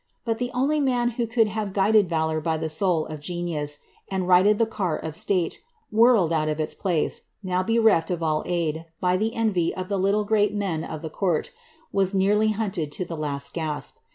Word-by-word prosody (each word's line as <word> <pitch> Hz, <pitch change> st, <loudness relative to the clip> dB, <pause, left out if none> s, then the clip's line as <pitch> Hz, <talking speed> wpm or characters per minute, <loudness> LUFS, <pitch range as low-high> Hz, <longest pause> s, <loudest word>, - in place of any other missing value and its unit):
But 225 Hz, -1 st, -1 dB
the 245 Hz, 0 st, -1 dB
only 285 Hz, +4 st, +2 dB
man 250 Hz, -4 st, +1 dB
who 235 Hz, 0 st, -2 dB
could 225 Hz, -1 st, +2 dB
hare 215 Hz, 0 st, -2 dB
guided 200 Hz, 0 st, +3 dB
valour 160 Hz, -1 st, 0 dB
by 160 Hz, 0 st, 0 dB
the 160 Hz, 0 st, -3 dB
soul 160 Hz, 0 st, +1 dB
of 155 Hz, -1 st, -7 dB
genius, 155 Hz, -2 st, -2 dB, 0.3 s
and 190 Hz, -2 st, -2 dB
righted 185 Hz, +3 st, +5 dB
the 230 Hz, -, +3 dB
car 190 Hz, -7 st, -2 dB
of 160 Hz, -1 st, -6 dB
state, 180 Hz, -1 st, 0 dB, 0.3 s
whirled 220 Hz, -6 st, +4 dB
out 155 Hz, -1 st, +1 dB
of 155 Hz, 0 st, -2 dB
its 155 Hz, -, -1 dB
place, 175 Hz, -6 st, -1 dB, 0.2 s
now 185 Hz, -1 st, 0 dB
bereft 220 Hz, -5 st, +3 dB
of 175 Hz, -2 st, -2 dB
all 155 Hz, -1 st, +1 dB
aid, 165 Hz, -2 st, -2 dB
by 180 Hz, 0 st, +2 dB
the 220 Hz, +4 st, -1 dB
envy 200 Hz, -7 st, +1 dB
of 185 Hz, 0 st, -5 dB
the 200 Hz, -1 st, 0 dB
little 200 Hz, +3 st, +2 dB
great 210 Hz, -1 st, +2 dB
men 185 Hz, -6 st, -1 dB
of 155 Hz, 0 st, -7 dB
the 160 Hz, -, -5 dB
court, 175 Hz, -4 st, -1 dB, 0.4 s
was 195 Hz, 0 st, +1 dB
nearly 210 Hz, +3 st, +3 dB
hunted 195 Hz, -8 st, -2 dB
to 185 Hz, -, -3 dB
the 170 Hz, -, -6 dB
last 145 Hz, -2 st, -3 dB
gasp. 155 Hz, -3 st, -4 dB
185 Hz, 205 wpm, -24 LUFS, 160-210 Hz, 0.4 s, righted